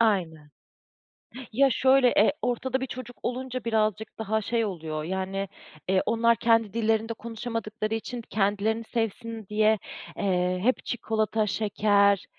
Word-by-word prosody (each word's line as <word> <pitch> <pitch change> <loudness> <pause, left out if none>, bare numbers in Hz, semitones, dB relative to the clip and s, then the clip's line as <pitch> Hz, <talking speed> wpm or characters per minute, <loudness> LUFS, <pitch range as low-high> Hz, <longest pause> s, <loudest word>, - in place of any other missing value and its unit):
Aynen. 170 -9 +1 1.0
Ya, 275 +3 +5
şöyle, 265 0 +5
e, 215 - +4
ortada 255 +2 -1
bir 265 - -2
çocuk 245 -1 -8
olunca 255 0 -3
birazcık 220 -2 -1
daha 220 0 0
şey 230 +1 0
oluyor, 160 -5 -4
yani, 190 +2 -2 0.4
eee, 185 0 +3
onlar 230 0 +3
kendi 225 -3 +2
dillerinde 225 0 +1
konuşamadıkları 225 -1 -4
için 235 +2 -5
kendilerini 215 +2 0
sevsin 225 -1 -3
diye, 215 +1 +3 0.4
eee, 180 -1 +1
hep 255 +3 +1
çikolata, 220 -2 0
şeker, 200 -1 +2
220 Hz, 125 wpm, -27 LUFS, 200-230 Hz, 1.0 s, Ya